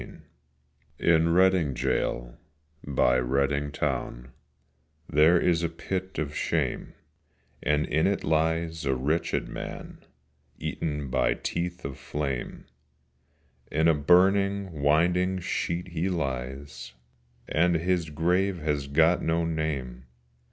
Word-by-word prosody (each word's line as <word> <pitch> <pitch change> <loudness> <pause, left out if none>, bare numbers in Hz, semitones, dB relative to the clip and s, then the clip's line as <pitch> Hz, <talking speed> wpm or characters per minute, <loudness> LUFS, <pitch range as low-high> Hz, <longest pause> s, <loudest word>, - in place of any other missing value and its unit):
VI - - -11 0.8
IN 85 -1 +3
Reading 90 -5 +3
gaol - - -1 0.5
by 65 -3 +2
Reading 70 +3 0
town 60 -3 -3 0.8
There 80 +4 +5
is 85 -1 +2
a 85 - 0
pit 95 +3 -5
of 75 -1 -3
shame, - - -2 0.7
And 75 0 +1
in 80 +4 +1
it 100 0 -1
lies 80 0 0
a 65 -1 +1
wretched 75 +6 -1
man - - -8 0.5
Eaten 75 -4 -3
by - - +2
teeth 90 -1 -4
of 70 -1 -6
flame, 70 -4 -4 1.1
In 80 +2 +2
a 80 - +6
burning 95 +2 +2
winding 90 +6 +2
sheet 85 0 -3
he 85 +2 -1
lies, 65 -5 -4 0.5
And 85 +2 +2
his 85 0 0
grave 90 +5 +1
has 75 -3 -2
got 80 +5 +3
no 80 +1 0
name. 70 -6 -3
80 Hz, 115 wpm, -27 LUFS, 70-85 Hz, 1.1 s, a